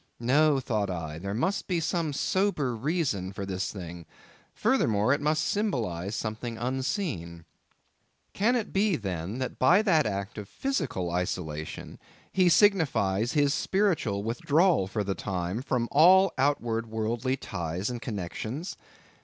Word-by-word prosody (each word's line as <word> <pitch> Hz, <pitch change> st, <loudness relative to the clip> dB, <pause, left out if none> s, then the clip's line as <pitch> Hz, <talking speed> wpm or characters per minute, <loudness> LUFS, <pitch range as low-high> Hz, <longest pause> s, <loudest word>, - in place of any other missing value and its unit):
No, 140 Hz, +4 st, +3 dB
thought 110 Hz, -6 st, -1 dB
I, 80 Hz, -3 st, -4 dB
there 100 Hz, +3 st, -4 dB
must 190 Hz, -, -1 dB
be 180 Hz, -3 st, 0 dB
some 165 Hz, -1 st, -1 dB
sober 150 Hz, -, 0 dB
reason 125 Hz, -, -1 dB
for 100 Hz, 0 st, -5 dB
this 95 Hz, 0 st, -3 dB
thing; 85 Hz, -4 st, -8 dB, 0.4 s
furthermore, 110 Hz, +2 st, +2 dB
it 145 Hz, -, -1 dB
must 155 Hz, +1 st, +1 dB
symbolize 110 Hz, -, -1 dB
something 115 Hz, +2 st, -4 dB
unseen. 125 Hz, -, -3 dB, 0.9 s
Can 230 Hz, +5 st, +2 dB
it 230 Hz, -4 st, -2 dB
be, 200 Hz, -1 st, +2 dB
then, 95 Hz, -, -4 dB
that 130 Hz, -1 st, -4 dB
by 175 Hz, +11 st, +5 dB
that 165 Hz, -8 st, +3 dB
act 100 Hz, +2 st, -4 dB
of 100 Hz, -, -8 dB
physical 135 Hz, -, -2 dB
isolation, 80 Hz, -3 st, -4 dB, 0.3 s
he 185 Hz, -2 st, +4 dB
signifies 125 Hz, -, +3 dB
his 145 Hz, -2 st, +3 dB
spiritual 160 Hz, -, 0 dB
withdrawal 145 Hz, -, +2 dB
for 105 Hz, +1 st, -2 dB
the 100 Hz, 0 st, -1 dB
time, 95 Hz, +2 st, -3 dB
from 125 Hz, -3 st, -1 dB
all 185 Hz, +5 st, +6 dB
outward 120 Hz, -5 st, 0 dB
worldly 115 Hz, +4 st, -1 dB
ties 90 Hz, +1 st, -3 dB
and 120 Hz, -1 st, -5 dB
connexions? 110 Hz, -, -5 dB
120 Hz, 135 wpm, -28 LUFS, 100-155 Hz, 0.9 s, all